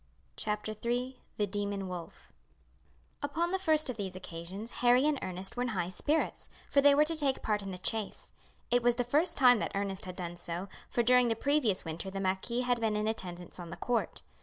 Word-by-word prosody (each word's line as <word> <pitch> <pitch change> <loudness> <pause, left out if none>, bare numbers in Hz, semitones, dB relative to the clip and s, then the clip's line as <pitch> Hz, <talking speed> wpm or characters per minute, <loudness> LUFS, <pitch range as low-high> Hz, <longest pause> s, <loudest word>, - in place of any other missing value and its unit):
CHAPTER 210 +1 -2
III 245 +2 -1 0.2
The 210 - +2
Demon 200 -1 -2
Wolf 175 -2 -8 0.9
Upon 330 +4 -1
the 380 - +1
first 315 -4 +2
of 250 -3 0
these 190 -3 -4
occasions 185 +5 -7
Harry 245 +2 +5
and 300 -2 +2
Ernest 185 +1 -3
were 245 - -2
in 250 - 0
high 175 0 0
spirits, 300 +11 0 0.2
for 280 - +5
they 285 0 +7
were 300 +1 +5
to 330 +1 +2
take 280 -4 +1
part 210 -1 +1
in 195 - -6
the 185 - -5
chase. 215 +3 -1 0.4
It 245 0 +4
was 240 0 +3
the 245 - 0
first 305 +8 +1
time 250 -4 +7
that - - -3
Ernest 195 -1 -2
had 185 -1 -6
done 175 -2 -5
so, 175 +2 -5 0.2
for 240 - +1
during 250 +1 +5
the 225 - +1
previous 250 -7 +1
winter 165 +4 -4
the 195 0 -4
marquis 195 +6 0
had 245 -1 +1
been 220 -2 +1
in 210 +1 0
attendance 180 -5 -5
on 175 -1 -7
the - - -7
court. 240 -1 -1
220 Hz, 210 wpm, -31 LUFS, 190-250 Hz, 0.9 s, they